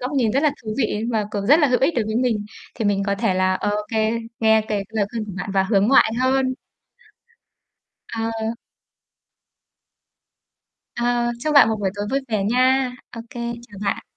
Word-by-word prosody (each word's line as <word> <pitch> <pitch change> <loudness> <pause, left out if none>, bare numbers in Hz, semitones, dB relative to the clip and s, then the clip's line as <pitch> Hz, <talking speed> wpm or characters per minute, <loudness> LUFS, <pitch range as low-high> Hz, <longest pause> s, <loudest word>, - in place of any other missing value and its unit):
góc 255 +2 -3
nhìn 250 -6 +2
rất 275 +3 +1
là 305 - +4
thú 215 -1 -4
vị 215 -3 0
và 215 -2 +1
cũng 200 -1 -3
rất 295 +4 +6
là 295 - +5
hữu 250 -2 +2
ích 295 +5 +2
đối 235 -5 0
với 220 +1 -2
mình. 235 -4 0 0.3
Thì 225 - -4
mình 200 -1 +1
có 200 - +1
thể 195 -1 0
là 185 0 +2
ô 205 - -1 0.2
kê, 220 0 +1 0.3
nghe 220 0 +5
cái 200 -2 -1
lời 220 -2 0
khuyên 225 -2 -4
của 205 - -8
bạn 195 - -4
và 190 - +4
hướng 200 +2 +2
ngoại 265 -4 +5
hơn. 260 0 +2 1.5
Ờ. 225 0 -3 2.6
Ờ. 240 0 0
Chúc 305 +2 -1
bạn 280 -5 +8
một 220 - 0
buổi 195 -2 0
tối 205 0 -4
vui 275 +1 +1
vẻ 215 -4 0
nha. 255 +3 +2 0.2
Ô 230 - -5
kê, 240 - -7 0.3
chào 205 - -12
bạn. 200 - -1
225 Hz, 195 wpm, -22 LUFS, 205-255 Hz, 2.6 s, bạn